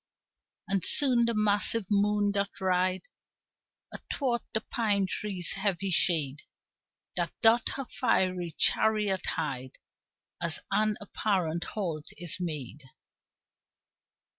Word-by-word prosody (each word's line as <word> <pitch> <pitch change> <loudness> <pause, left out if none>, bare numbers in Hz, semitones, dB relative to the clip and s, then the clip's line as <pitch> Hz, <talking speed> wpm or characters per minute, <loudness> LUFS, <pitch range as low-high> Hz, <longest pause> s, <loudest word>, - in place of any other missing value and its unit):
And 195 -2 0
soon 250 -5 +3
the 235 -1 -1
massive 210 +1 +3
moon 205 0 +2
doth 200 0 -3
ride 185 0 +1 0.9
Athwart 245 -4 -2
the 220 - -1
pine 205 -4 0
trees' 185 -3 0
heavy 195 -1 -1
shade, 150 -5 +3 0.7
That - - 0
doth 225 +1 +5
her 275 - -4
fiery 185 - 0
chariot 210 -3 +2
hide, 130 -5 -3 0.6
As 170 -3 +2
an 215 -1 +2
apparent 185 -5 -1
halt 165 -8 -3
is 175 -1 -2
made. 150 -5 -5
195 Hz, 105 wpm, -29 LUFS, 175-215 Hz, 0.9 s, doth